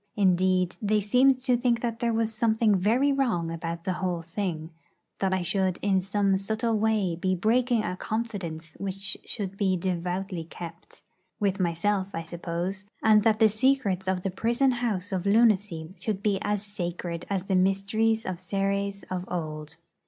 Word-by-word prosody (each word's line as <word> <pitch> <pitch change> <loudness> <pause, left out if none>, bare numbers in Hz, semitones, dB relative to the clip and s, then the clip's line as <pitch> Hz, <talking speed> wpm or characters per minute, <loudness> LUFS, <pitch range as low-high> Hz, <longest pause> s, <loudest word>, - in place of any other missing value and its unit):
Indeed, 185 -2 +2
they 210 0 +2
seemed 250 +6 +4
to 255 -1 +2
think 240 -1 +1
that 230 -1 -2
there 235 -1 +1
was 225 0 0
something 220 -1 +2
very 230 +9 +3
wrong 225 -12 0
about 165 0 -4
the 185 - -1
whole 175 -3 -1
thing; 165 -2 -4 0.5
that 190 -1 +1
I 190 -1 0
should 190 0 0
in 195 -2 +3
some 195 0 +1
subtle 220 +3 -1
way 210 -5 +1
be 185 +2 0
breaking 235 +4 +2
a 180 - -2
confidence 185 -9 -4
which 195 +1 -4
should 195 -3 -5
be 190 -2 +2
devoutly 180 0 -2
kept 170 +1 -10 0.4
with 200 -1 0
myself, 185 +3 +1
I 165 - -3
suppose; 175 +3 -4 0.2
and 215 -1 +6
that 215 0 +3
the 220 - +6
secrets 215 -5 +1
of 185 -1 0
the 195 - -1
prison 235 +7 +2
house 220 -6 -2
of 190 0 -1
lunacy 200 -7 +3
should 205 -3 -2
be 200 -2 +2
as 205 -1 -1
sacred 175 -3 -5
as 195 -2 -1
the 195 -1 0
mysteries 200 +4 +2
of 185 -2 -4
Ceres 200 +1 -1
of 180 -1 -2
old. 155 -2 -5
195 Hz, 165 wpm, -27 LUFS, 180-220 Hz, 0.5 s, and